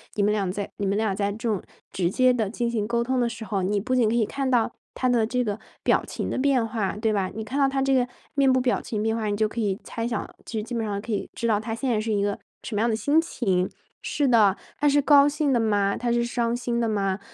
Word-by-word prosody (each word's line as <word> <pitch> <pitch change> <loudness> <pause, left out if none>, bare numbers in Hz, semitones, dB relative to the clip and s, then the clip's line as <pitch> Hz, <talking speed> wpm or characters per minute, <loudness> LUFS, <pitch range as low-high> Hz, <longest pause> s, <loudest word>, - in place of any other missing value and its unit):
你 205 - +1
们 210 +1 +3
俩 195 -3 0
在 200 +1 -4
你 200 - -2
们 200 +1 +1
俩 215 -2 +1
在 200 0 0
这 220 +3 -4
种 205 -4 0 0.3
直 175 -3 +1
接 255 +6 +4
地 220 -5 0
进 235 +1 -2
行 220 -3 -1
沟 235 +1 0
通 260 +1 0
的 235 - +1
时 225 -1 -7
候， 195 -1 -1
你 200 +2 +1
不 255 +5 -1
仅 235 -4 +3
可 225 - 0
以 230 -2 +3
看 270 +4 -2
到 235 -2 +2 0.2
他 255 - 0
的 240 -3 +3
这 250 +2 0
个 210 -2 -3 0.2
表 - - +3
情 - - -4
的 - - -2
变 260 -4 +2
化， 215 -3 -2
对 220 -1 +1
吧？ 195 -2 0
你 220 - -5
看 265 +6 -3
到 275 - +4
他 270 0 -1
这 270 0 +2
个 250 -2 +3 0.3
面 275 -2 +4
部 260 - +3
表 250 -1 +1
情 215 -2 -3
变 225 0 +1
化， 220 -2 -2
你 205 -1 -1
就 215 - +2
可 225 +2 -4
以 200 0 -1
猜 230 - -4
想， 230 -4 -3 0.2
就 220 - -4
基 240 - -7
本 230 - -1
上 205 -2 -2
可 225 +3 -6
以 205 - -2
知 235 - -1
道 210 -2 +3
他 225 +1 -4
现 265 +3 -3
在 220 -3 +1
是 225 - -2
一 200 -1 +1
个 205 0 -1 0.3
什 240 - -6
么 205 - +1
样 235 - +2
的 220 - +1
心 290 +7 +3
情。 190 - 0 0.3
是 290 - 0
的， 210 -6 +5 0.2
他 290 - +4
是 285 +1 +4
高 285 0 +6
兴 295 -1 0
的 240 - +3
吗？ 205 -3 +2
他 240 -1 -1
是 235 0 +2
伤 235 -1 0
心 240 -1 -2
的 230 - +1
吗？ 195 -2 0
225 Hz, 310 characters per minute, -25 LUFS, 205-250 Hz, 0.3 s, 高